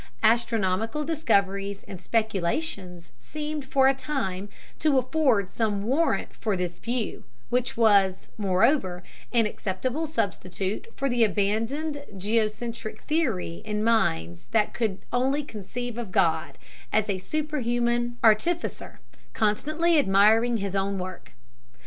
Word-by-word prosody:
Astronomical 225 +2 +2
discoveries 200 -10 0
and 190 -2 -9
speculations 190 - -2
seemed 300 -1 -5
for 265 0 +3
a 270 - +5
time 205 -9 -3 0.3
to 295 -3 +3
afford 255 -7 +2
some 210 -3 -1
warrant 275 +9 +1
for 210 -4 -1
this 175 -1 -3
view, 240 -1 -3 0.3
which 250 -1 0
was, 200 -5 +4
moreover, 190 -1 +2 0.3
an 235 -2 +3
acceptable 245 +10 -2
substitute 195 - -2
for 275 - -1
the 240 -3 +3
abandoned 225 +9 0
geocentric 220 +2 -2
theory 230 - -1
in 210 -1 -2
minds 85 - +1
that 220 -2 +2
could 220 -5 -1 0.2
only 265 +4 +1
conceive 240 +1 -6
of 225 -6 -5
God 165 -4 +1 0.3
as 215 -1 +2
a 195 -2 -1
superhuman 240 -2 -1
artificer, 235 +11 +1 0.3
constantly 310 +10 +2
admiring 220 +2 +4
his 200 -2 -3
own 195 0 0
work. 185 -1 -7
220 Hz, 120 wpm, -26 LUFS, 195-260 Hz, 0.3 s, a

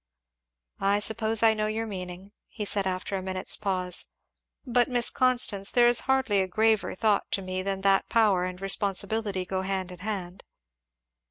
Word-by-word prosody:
"I 200 +1 +2
suppose 220 +1 0
I 225 -1 +6
know 215 0 -1
your 220 +1 -2
meaning," 185 -1 -8 0.2
he 210 - -6
said 200 -1 +1
after 185 +1 -3
a 190 - -2
minute's 185 0 -2
pause; 185 -3 -2 0.6
"but, 245 -1 +2
Miss 245 -2 +3
Constance, 240 -6 +2
there 240 -1 +4
is 240 0 +4
hardly 260 -7 +2
a 190 - -1
graver 220 +2 +1
thought 210 0 +1
to 195 - 0
me 185 0 -3
than 195 0 -3
that 195 0 +2
power 210 -5 +3
and 180 0 -5
responsibility 195 0 -1
go 190 0 -2
hand 190 -1 -3
in 180 - -11
hand." 190 -2 -5
200 Hz, 170 wpm, -27 LUFS, 185-220 Hz, 0.6 s, I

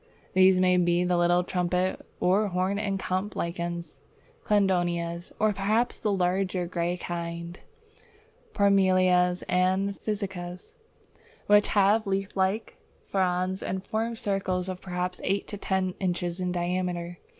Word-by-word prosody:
These 185 0 +5
may 180 0 +4
be 175 0 +2
the 180 0 +1
little 175 +1 +3
trumpet 180 +1 -1 0.2
or 200 +4 +3
horn 185 +2 0
and 200 -2 -1
cup 190 +3 -2
lichens, 170 0 -4 0.5
Cladonias, 175 -4 0
or 215 -1 +2
perhaps 215 +5 0
the 210 - 0
larger 185 -1 0
grey 175 0 -2
kinds, 170 0 -5 1.0
Parmelias 185 -3 +3
and 190 +2 +1
Physcias, 190 -4 -5 0.7
which 205 0 +5
have 205 +2 +4
leaf 195 0 -2
like 195 +3 -1 0.3
fronds 185 0 0
and 190 +1 -4
form 225 +2 -2
circles 190 -3 -1
of 185 -1 -5
perhaps 180 0 -3
eight 195 +1 0
to 205 - -5
ten 190 -2 -1
inches 175 -1 -2
in 180 -1 -1
diameter. 175 -1 -2
185 Hz, 130 wpm, -27 LUFS, 180-195 Hz, 1.0 s, These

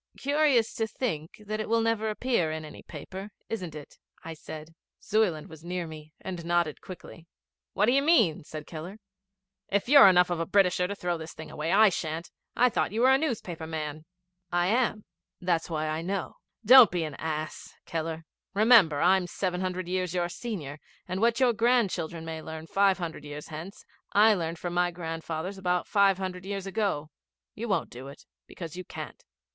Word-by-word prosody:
'Curious 285 -5 +2
to 225 - -1
think 210 - -4
that 215 +1 -3
it 215 - -3
will 230 0 +3
never 225 -1 0
appear 215 -6 0
in 155 0 -5
any 150 - -11
paper, 190 +6 -8 0.2
isn't 180 -8 -4
it? 150 -2 -11 0.3
'I 165 - -5
said. 155 0 -9 0.3
Zuyland 195 -8 +1
was 160 -1 -13
near 175 0 -3
me, 155 -1 -10
and 185 -2 -5
he 170 - -8
nodded 170 -3 +1
quickly. 170 -2 -11 0.5
'What 200 - +3
do 235 - +3
you 275 +2 +4
mean?' 255 - +3
said 155 0 -8
Keller. 170 +5 -8 0.7
'If 200 +2 0
you're 280 -5 +9
enough 180 -1 +5
of 175 - -1
a 165 - -2
Britisher 180 -2 +3
to 200 - -4
throw 175 -3 -2
this 160 0 -8
thing 160 0 -9
away, 155 +2 -3
I 215 +2 +7
shan't. 165 -2 -4 0.2
I 250 - +5
thought 235 - 0
you 220 +3 -1
were 260 +2 +6
a 265 - +6
newspaper 190 - -3
man.' 155 -1 -5 0.5
'I 175 0 +2
am. 225 -2 +1 0.3
That's 175 -2 0
why 155 -1 -2
I 155 +1 -2
know. 190 +2 -3 0.3
Don't 250 -1 +10
be 175 -2 -1
an 155 -2 -4
ass, 155 0 -5
Keller. 165 0 -4 0.3
Remember, 205 -9 +6
I'm 180 +1 +4
seven 180 0 -2
hundred 185 -1 -3
years 185 -1 -2
your 175 -1 0
senior, 170 - -6 0.3
and 185 +2 -3
what 235 +1 +3
your 250 -2 +4
grandchildren 200 -9 +1
may 160 -1 -5
learn 160 0 -7
five 195 +3 +3
hundred 170 -5 -5
years 145 0 -8
hence, 165 +5 -8 0.3
I 215 +2 +6
learned 170 -3 -2
from 175 +1 -4
my 175 0 +2
grandfathers 165 +2 -5
about 180 -2 0
five 200 -2 +4
hundred 185 -1 -5
years 195 0 -4
ago. 195 -7 -2 0.4
You 235 +2 -5
won't 195 -6 0
do 130 +3 -9
it, 140 - -12 0.2
because 165 -2 -8
you 185 - -6
can't.' - - -9
180 Hz, 190 wpm, -28 LUFS, 160-210 Hz, 0.7 s, Don't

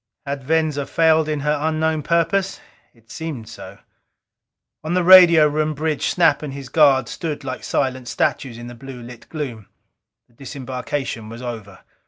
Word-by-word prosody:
Had 140 -1 -4
Venza 155 -1 0
failed 160 -1 +2
in 150 -2 -2
her 150 +1 +1
unknown 160 0 0
purpose? 170 +5 0 0.3
It 115 -1 -22
seemed 150 -9 -6
so. - - -11 1.1
On 160 +3 -2
the 180 - +2
radio 170 -4 +8
room 155 +1 -1
bridge 155 0 -1
Snap 170 -2 +2
and 150 -3 -6
his 135 -2 -8
guard 135 -5 +4
stood 160 -2 -5
like 130 -1 -6
silent 130 -1 -2
statues 120 -1 -1
in 120 - -9
the 120 - -9
blue 125 0 -10
lit 120 -1 -12
gloom. 125 -10 -6 0.6
The - - -31
disembarkation 130 -2 -5
was 115 +2 -9
over. 110 -5 -8
145 Hz, 160 wpm, -20 LUFS, 125-160 Hz, 1.1 s, radio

